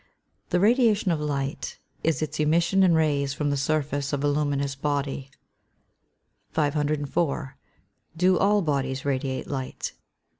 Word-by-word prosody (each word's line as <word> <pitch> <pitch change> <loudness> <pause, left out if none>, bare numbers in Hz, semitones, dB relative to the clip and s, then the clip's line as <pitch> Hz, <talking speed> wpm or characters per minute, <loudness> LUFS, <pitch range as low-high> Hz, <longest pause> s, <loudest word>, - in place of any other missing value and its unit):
_ - - -40
The 180 - +2
radiation 215 -2 +3
of 160 - 0
light 140 -1 -3 0.3
is 160 -1 +1
its 155 0 -4
emission 170 +5 +3
in 180 -3 +5
rays 145 -3 +1
from 145 -1 0
the - - +1
surface 145 0 -1
of 145 -1 -1
a - - +3
luminous 145 -1 0
body. 140 -1 -2 1.2
504. 145 -1 0 0.6
_Do 180 +1 +3
all 205 0 +3
bodies 135 -3 -1
radiate 135 -1 -1
light? 130 -2 -4
145 Hz, 135 wpm, -26 LUFS, 140-165 Hz, 1.2 s, in